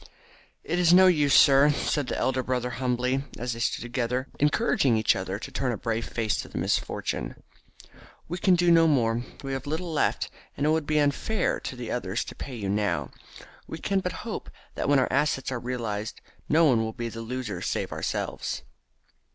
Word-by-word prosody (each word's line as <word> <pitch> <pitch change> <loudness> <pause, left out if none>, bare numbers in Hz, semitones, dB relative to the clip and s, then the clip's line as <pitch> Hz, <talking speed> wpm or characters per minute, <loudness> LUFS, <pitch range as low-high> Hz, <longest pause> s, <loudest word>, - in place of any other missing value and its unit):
"It 175 +2 -1
is 175 -2 +5
no 185 +1 +8
use, 150 -6 +4
sir," 140 +1 +7
said 145 -1 0
the - - -2
elder 130 0 +1
brother 125 -1 -2
humbly, 125 +1 0
as 120 0 -3
they 115 - -7
stood 115 - -1
together 125 +2 -2
encouraging 130 -3 +2
each 110 - +3
other 95 +1 -3
to - - -8
turn 130 -2 -1
a 115 - -3
brave 115 +1 -2
face 110 -4 -1
to - - -6
misfortune, - - -2 0.9
"we 175 +2 -4
can 185 0 +4
do 175 0 +3
no 165 -1 +6
more. 120 -5 +2 0.2
We 135 0 -3
have 135 +1 -4
little 160 +3 -3
left, 150 - 0 0.3
and 145 - 0
it - - +3
would 160 -2 0
be 155 - +1
unfair 150 +8 +1
to 140 - -6
the 120 -2 -6
others 95 -6 -2
to - - -9
pay 135 - -7
you 105 -4 -4
now. 100 -3 0 0.6
We - - -6
can 195 +3 0
but 180 -2 -5
hope - - -5 0.2
that - - -2
when 145 - +5
our 130 - +1
assets 135 -2 +1
are 125 - -2
realised 115 -4 -4 0.3
no 160 +2 +5
one 125 -6 +4
will 110 0 -3
be 120 +1 -4
the 115 0 -7
loser 115 -6 -4
save - - -2
ourselves." - - -3
130 Hz, 195 wpm, -27 LUFS, 115-150 Hz, 0.9 s, no